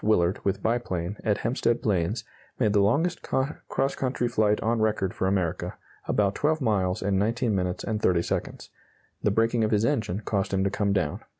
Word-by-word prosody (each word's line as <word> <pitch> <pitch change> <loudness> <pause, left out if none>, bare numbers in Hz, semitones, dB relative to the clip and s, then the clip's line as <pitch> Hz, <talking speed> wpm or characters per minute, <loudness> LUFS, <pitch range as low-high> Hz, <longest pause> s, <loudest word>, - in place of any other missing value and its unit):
Willard, 95 -4 +2
with 100 - -1
biplane, 105 -5 -1
at 105 -2 +1
Hempstead 120 -1 0
Plains, 100 +2 0 0.3
made 110 -5 +2
the 105 - +4
longest 160 - +1
cross 135 0 -1
country 125 -2 -1
flight 105 -3 +2
on 115 +1 +1
record 105 -4 0
for 95 - -1
America 95 -4 -1 0.3
about 100 -2 +2
12 155 +6 +1
miles 100 -8 0
in 100 -1 +1
19 115 +2 +1
minutes 90 -2 -1
and 110 -1 -2
30 85 -2 +3
seconds. - - -4 0.5
The - - +2
breaking 115 +2 +2
of 110 - +2
his 110 0 +2
engine 110 -8 0
caused 100 -3 -1
him 95 - +1
to 100 - +1
come 100 0 0
down. 90 -7 0
105 Hz, 185 wpm, -26 LUFS, 95-115 Hz, 0.5 s, the